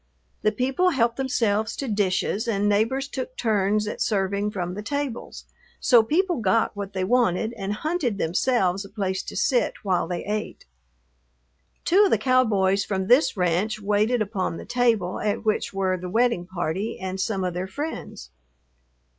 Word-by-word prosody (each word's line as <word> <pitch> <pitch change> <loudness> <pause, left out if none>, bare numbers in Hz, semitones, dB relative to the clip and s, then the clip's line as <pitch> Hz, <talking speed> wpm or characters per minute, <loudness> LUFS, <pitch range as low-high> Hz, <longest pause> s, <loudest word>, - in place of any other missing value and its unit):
The 215 - +2
people 265 - +1
helped 235 -7 +1
themselves 225 -6 0
to 275 - -4
dishes 205 +1 0
and 205 -2 +1
neighbors 225 +7 +1
took 255 -2 -6
turns 210 -1 +1
at - - -5
serving 200 -1 0
from 180 -3 -4
the 205 - -5
tables, 285 +1 -4 0.3
so 240 -3 +6
people 350 - +1
got 220 0 +1
what 200 -1 -6
they 190 -1 -1
wanted 225 0 +1
and 200 -3 -4
hunted 265 - -1
themselves 195 +1 +1
a 200 - -11
place 190 -2 -2
to - - -9
sit 250 -3 +1
while 185 -4 +1
they 175 -1 -4
ate. 210 +1 -4 1.2
Two 395 +4 +5
of - - +2
the - - +3
cowboys 205 -7 +2
from 190 -2 -2
this 245 +2 +4
ranch 180 +5 0
waited 215 +3 +1
upon 195 -5 -3
the - - -8
table 230 -7 +1
at 210 +1 -2
which 215 - 0
were 190 -1 0
the 180 0 -6
wedding 225 -4 +1
party 185 +4 -3
and 190 0 -4
some 195 -2 -1
of 180 -1 -1
their 180 +2 -3
friends. 190 - -6
210 Hz, 165 wpm, -24 LUFS, 190-245 Hz, 1.2 s, so